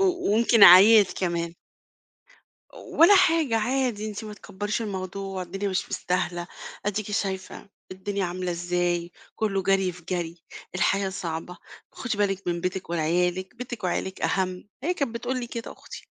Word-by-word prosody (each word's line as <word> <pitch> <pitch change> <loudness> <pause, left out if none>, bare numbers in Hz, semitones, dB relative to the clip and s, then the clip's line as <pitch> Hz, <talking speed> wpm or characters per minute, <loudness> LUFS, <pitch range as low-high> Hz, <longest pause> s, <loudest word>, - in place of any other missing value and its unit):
و 390 - +4
وممكن 235 - +3
عييت 200 +3 +9
كمان. 170 -2 -2 1.2
ولا 405 -6 +4
حاجة، 325 -10 +3
عادي، 240 -3 -1
"أنتِ 210 +1 -6
ما 210 -1 -7
تكبّريش 205 +3 -4
الموضوع، 190 -1 -5
الدنيا 195 +3 -4
مش 185 - -2
مستاهلة، 175 -1 -2 0.4
أديكِ 210 0 -2
شايفة 190 -1 -3 0.2
الدنيا 195 +1 -3
عاملة 180 +1 -3
إزاي، 175 0 -1 0.2
كله 195 -3 0
جري 190 -1 +2
في 180 0 -14
جري، 170 -2 -3 0.3
الحياة 195 +2 +1
صعبة، 175 -1 -5 0.4
خُدِ 240 -5 -4
بالِك 195 -2 -1
من 170 -1 -1
بيتِك 180 -1 -4
وعيالِك، 180 +5 0
بيتِك 240 -4 -7
وعيالِك 190 +1 -2
أهَم" 185 0 -1
هي 355 +4 0
كانت 275 -8 -2
بتقول 250 +2 -3
لي 240 - -4
كده 235 -1 -6
أختي. - - -12
195 Hz, 145 wpm, -25 LUFS, 180-220 Hz, 1.2 s, عييت